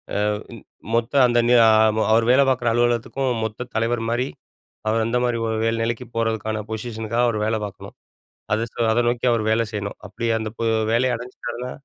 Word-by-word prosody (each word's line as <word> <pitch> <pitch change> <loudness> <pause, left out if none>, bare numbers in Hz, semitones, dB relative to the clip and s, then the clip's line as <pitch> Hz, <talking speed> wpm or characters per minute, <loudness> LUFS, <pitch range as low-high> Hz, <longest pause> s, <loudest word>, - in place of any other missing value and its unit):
அ - - +1
இ - - +2 0.7
மொத்த 115 +2 0
அந்த 120 0 +2
நியா 120 -2 +6 0.5
அவரு 115 +1 +4
வேல 135 +2 +5
பார்க்கிற 125 -2 0
அலுவலகத்துக்கும், 120 +2 0
மொத்த 110 +3 -4
தலைவர்மாரி 115 +2 0 0.6
அவரு 115 +1 +1
அந்தமாரி 120 0 0
ஒரு 110 0 -1
வேற 115 0 0
நிலைக்கு 120 +1 -3
போறதுக்கான 110 -1 -1
பொசிஷனுக்காக 110 +1 -2
அவரு 110 -3 -1
வேல 110 0 0
பார்க்கணும். 100 - -10 0.6
அத 110 +2 0
ச - - -19 0.2
அத 120 - +2
நோக்கி 120 +1 -2
அவரு 110 -2 0
வேல 115 +1 +2
செய்யணும். 100 -1 -4
அப்பிடி 115 +3 -3
அந்த 110 -1 -3
பொ - - -1 0.3
வேலைய 125 +1 +2
அடஞ்சிட்டாருன்னா 125 0 -7
115 Hz, 165 wpm, -22 LUFS, 110-120 Hz, 0.7 s, நியா